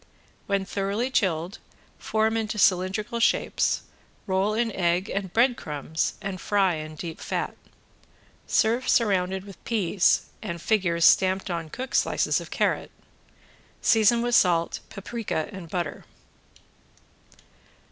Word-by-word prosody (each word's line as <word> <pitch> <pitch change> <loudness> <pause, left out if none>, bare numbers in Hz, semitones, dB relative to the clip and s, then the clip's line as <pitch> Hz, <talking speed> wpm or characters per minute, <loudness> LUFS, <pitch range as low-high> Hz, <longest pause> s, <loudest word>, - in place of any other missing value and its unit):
When 200 -1 0
thoroughly 200 +6 -2
chilled 180 -4 0 0.4
form 220 +1 0
into 220 -1 -2
cylindrical 195 +4 +1
shapes, 230 - +1 0.4
roll 195 +2 +1
in 230 0 0
egg 180 +1 0
and 195 -2 -3
bread 240 +5 +3
crumbs 155 -2 -3
and 195 -2 -4
fry 195 -3 +2
in 155 0 -7
deep 165 +1 -7
fat. - - -3 0.9
Serve 235 +4 +2
surrounded 190 -4 +2
with 200 -2 -13
peas 200 -5 +2 0.2
and 170 -6 -5
figures 170 -4 +1
stamped 190 0 +4
upon 165 -2 -4
cooked 260 +9 -5
slices - - +1
of - - -10
carrot. - - 0 0.9
Season 235 +1 +4
with 240 0 -1
salt, 170 -5 +3
paprika 195 -5 -4
and 190 -5 -9
butter. 170 -3 -3
195 Hz, 120 wpm, -26 LUFS, 175-220 Hz, 0.9 s, stamped